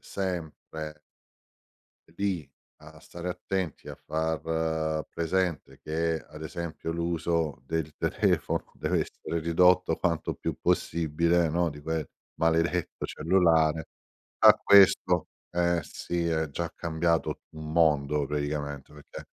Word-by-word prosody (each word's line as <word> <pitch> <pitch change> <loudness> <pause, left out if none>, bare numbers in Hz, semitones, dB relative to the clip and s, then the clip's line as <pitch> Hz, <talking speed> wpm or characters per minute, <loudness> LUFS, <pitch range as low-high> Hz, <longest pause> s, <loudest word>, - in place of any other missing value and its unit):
sempre 80 -4 -5 1.2
lì 90 -8 -1 0.3
a - - -13
stare 85 +1 -7
attenti 90 -2 -3
a - - -6
far 80 0 -1
presente 85 -1 -1
che, 80 +1 0
ad 75 - -11
esempio 80 0 -5
l'uso 85 -4 -1
del 80 0 -2
telefono - - 0
deve - - 0
essere 85 - -4
ridotto 90 +1 +4
quanto 85 -2 -1
più - - -4
possibile, 85 +1 +1
no, 85 +2 +1
di 75 -1 -8
quel 80 0 -2 0.3
maledetto 80 +1 +1
cellulare 80 -3 +2 0.5
a - - +9
questo 95 -3 +5 0.2
eh, 85 0 +2
sì 85 +3 -3
è 80 -2 0
già 85 +4 -3
cambiato 85 0 0
un 80 -1 -7
mondo 75 -3 +3
praticamente 75 -1 -3
perché 75 -1 -11
80 Hz, 110 wpm, -28 LUFS, 80-85 Hz, 1.2 s, a